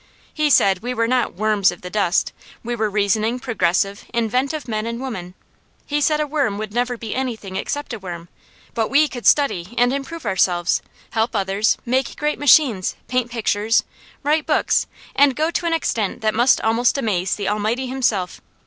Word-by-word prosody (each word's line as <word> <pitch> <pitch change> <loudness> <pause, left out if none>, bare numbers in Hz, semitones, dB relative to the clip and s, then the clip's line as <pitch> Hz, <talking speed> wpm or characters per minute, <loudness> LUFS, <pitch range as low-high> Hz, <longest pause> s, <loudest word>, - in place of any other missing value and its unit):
He 305 -1 +1
said 195 -8 +4
we 245 +4 -4
were 230 -1 +1
not 250 0 0
"worms 210 -1 +2
of 175 - -11
the 180 - -6
dust"; 190 -2 +1 0.3
we 240 +1 -3
were 220 -2 0
reasoning, 215 +3 +1
progressive, 200 -5 0
inventive 255 +6 -1
men 215 -1 -2
and 235 0 -4
women. 190 -9 -6 0.5
He 295 0 -1
said 305 +1 +2
a 300 - +1
worm 280 -9 -1
would 215 -1 -5
never 245 +1 -1
be 225 -2 -5
anything 230 -7 -4
except 290 +5 -3
a 225 - -5
worm, 175 -3 -7 0.5
but 225 -2 -1
we 300 +2 +4
could 245 -4 -4
study 240 - +2
and 245 +1 +3
improve 295 +4 -5
ourselves, 180 -2 +1 0.3
help 225 +1 0
others, 200 +1 +1
make 255 +1 0
great 300 0 -1
machines, 265 - +4
paint 250 -1 0
pictures, 225 -1 +1 0.4
write 300 +2 +1
books, - - +2 0.3
and 280 -2 +4
go 315 +4 0
to 340 - -1
an 335 - +1
extent 220 -10 -2
that 215 -1 +1
must 240 +4 +4
almost 230 +4 +2
amaze 195 -7 0
the 200 -2 -4
Almighty 215 +5 -1
Himself. 245 -8 -1
230 Hz, 180 wpm, -21 LUFS, 205-265 Hz, 0.5 s, said